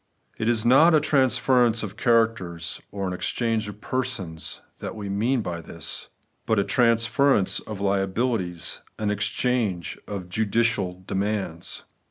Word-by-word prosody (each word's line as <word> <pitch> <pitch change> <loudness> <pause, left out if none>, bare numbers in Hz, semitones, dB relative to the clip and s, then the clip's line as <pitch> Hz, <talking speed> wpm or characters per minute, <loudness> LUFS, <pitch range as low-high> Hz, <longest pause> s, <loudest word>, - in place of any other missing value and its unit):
It 110 - +1
is 115 -1 +1
not 155 +7 +7
a - - +6
transference 130 -5 +3
of 105 -1 -5
characters 110 -8 +1
nor 100 -1 -3
an 90 - -2
exchange 115 +3 -1
of 105 +1 -9
persons 125 -11 -3 0.2
that - - -5
we 105 -2 -5
mean 115 +5 +1
by 85 -2 -4
this; 85 0 -6 0.4
but 110 - +2
a 100 - +4
transference 115 -1 +3
of 105 -2 -7
liabilities, 95 -2 -1 0.2
an 105 -1 0
exchange 105 -4 -1
of 100 -3 -5
judicial 105 -2 0
demands. 95 -4 -2
110 Hz, 135 wpm, -25 LUFS, 95-120 Hz, 0.4 s, not